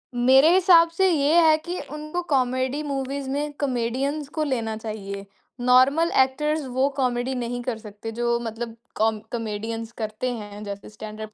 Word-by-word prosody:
मेरे 265 +5 +6
हिसाब 350 -3 +6
से 380 +3 +2
ये 310 +1 +4
है 315 -1 +5
कि 355 +1 -3
उनको 305 +3 -4
कॉमेडी 260 +2 +1
मूवीज़ 275 -1 -3
में 290 +2 -2
कॉमेडियन्स 270 +3 -1
को 310 - +2
लेना 230 -6 -1
चाहिए, 200 -3 -6 0.3
नॉर्मल 260 +7 +4
एक्टर्स 300 +3 -2
वो 260 +2 +1
कॉमेडी 250 0 0
नहीं 245 0 -3
कर 240 -2 -2
सकते 215 0 -8
जो 235 0 +1
मतलब 230 0 -5 0.2
कॉम 220 0 +1
कॉमेडियन्स 225 0 -4
करते 215 +4 -2
हैं, 210 -2 -8
जैसे 200 -1 -7
स्टैंड 215 +1 -9
अप 215 0 -7
250 Hz, 160 wpm, -24 LUFS, 225-285 Hz, 0.3 s, मेरे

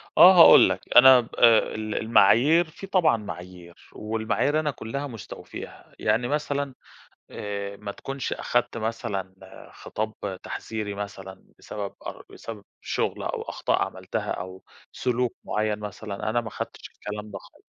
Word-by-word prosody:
آه 185 - +10
هاقول - - +9
لك، - - -2 0.2
أنا 130 +1 +10
ب 115 - -11
آآ 115 -2 +7 0.2
ال 110 0 -4
المعايير، 130 - +4
في 195 - -10
طبعًا 185 -10 +3
معايير، 90 -4 -10
والمعايير 110 +7 -1
أنا 150 -1 -1
كُلّها 140 +2 -5
مُستوفيها. 115 -7 -10
يعني 120 +2 +1
مثلًا 145 -2 -2 0.6
آآ 100 -1 -5
ما 100 0 -7
تكونش 135 +4 -5
أخدت 120 -1 -1
مثلًا 110 -4 -4 0.4
خِطاب 110 0 -5 0.3
تحذيري 110 -2 -5
مثلًا 95 -2 -8
بسبب 100 -2 -6
أر - - -7
بسبب 110 -3 -9 0.2
شُغل - - -2
أو - - -3
أخطاء - - -1
عملتها - - -4
أو 95 +1 -6 0.3
سلوك 125 -1 -1
مُعَيّن 105 0 -1
مثلًا، 105 0 -5
أنا 120 +2 +1
ما 115 -2 -7
خدتش - - -7
الكلام 105 +1 -8
ده 100 - -6
خالص - - -20
110 Hz, 140 wpm, -25 LUFS, 100-125 Hz, 0.6 s, آه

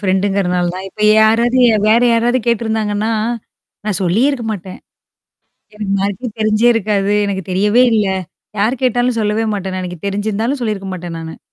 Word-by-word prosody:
ஃப்ரெண்டுங்கிறனால 190 -2 0
தான். 190 +1 -6
இப்ப 210 - -14 0.2
யாராவது 230 +3 +3
ய - - +4 0.2
வேற 225 +2 +5
யாராவது 240 +2 +2
கேட்டருந்தாங்கன்னா, 220 -2 0 0.7
நான் 210 -4 -1
சொல்லியே 200 +10 +2
இருக்க 260 -5 -4
மாட்டேன். 190 -2 -8 1.0
எனக்கு 210 -2 -4
மார்க்கே 200 +5 -2
தெரிஞ்சே 215 +2 +3
இருக்காது. 205 -2 0
எனக்கு 190 -2 -3
தெரியவே 205 +6 +3
இல்ல. 210 -3 +2 0.5
யார் 230 +5 0
கேட்டாலும் 245 -1 +1
சொல்லவே 215 +1 0
மாட்டேன் 190 -2 -4
எனக்கு 180 -1 -6
தெரிஞ்சிருந்தாலும் 215 +6 -2
சொல்லியிருக்க 200 -4 -3
மாட்டேன் 175 -2 -6
நானு. 160 0 -8
210 Hz, 145 wpm, -16 LUFS, 195-230 Hz, 1.0 s, வேற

